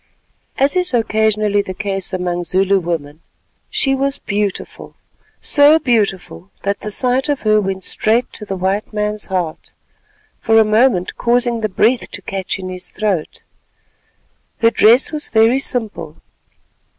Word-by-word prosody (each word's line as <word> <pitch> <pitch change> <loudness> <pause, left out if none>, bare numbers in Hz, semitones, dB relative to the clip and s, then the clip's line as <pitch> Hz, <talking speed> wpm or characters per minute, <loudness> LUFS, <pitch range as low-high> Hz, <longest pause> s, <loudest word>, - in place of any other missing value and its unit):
As 275 +4 +1
is 360 -7 0
occasionally 215 -2 +1
the 185 -2 -7
case 195 -1 -4
among 180 -1 -2
Zulu 195 +2 +1
women, 160 -3 -5 0.5
she 270 - 0
was 275 +1 0
beautiful—so 210 +8 0
beautiful 200 - -1
that 200 0 -1
the 210 - -6
sight 255 +5 +1
of 290 -2 -1
her 215 -1 +3
went 190 -1 -4
straight 225 +6 0
to - - -10
the 195 -2 -5
white 190 +3 -2
man's 210 0 -2
heart, 180 -5 -4 0.7
for 225 0 +2
a 220 - +6
moment 215 -4 +2
causing 240 -1 +1
the 215 - -1
breath 230 +6 +1
to - - -9
catch 195 -1 -4
in 185 -1 -7
his 185 0 -6
throat. 200 -7 -3 1.2
Her 230 0 +5
dress 230 +6 +4
was 305 -1 -3
very 225 +4 +3
simple. 240 -5 -3
215 Hz, 140 wpm, -17 LUFS, 190-240 Hz, 1.2 s, a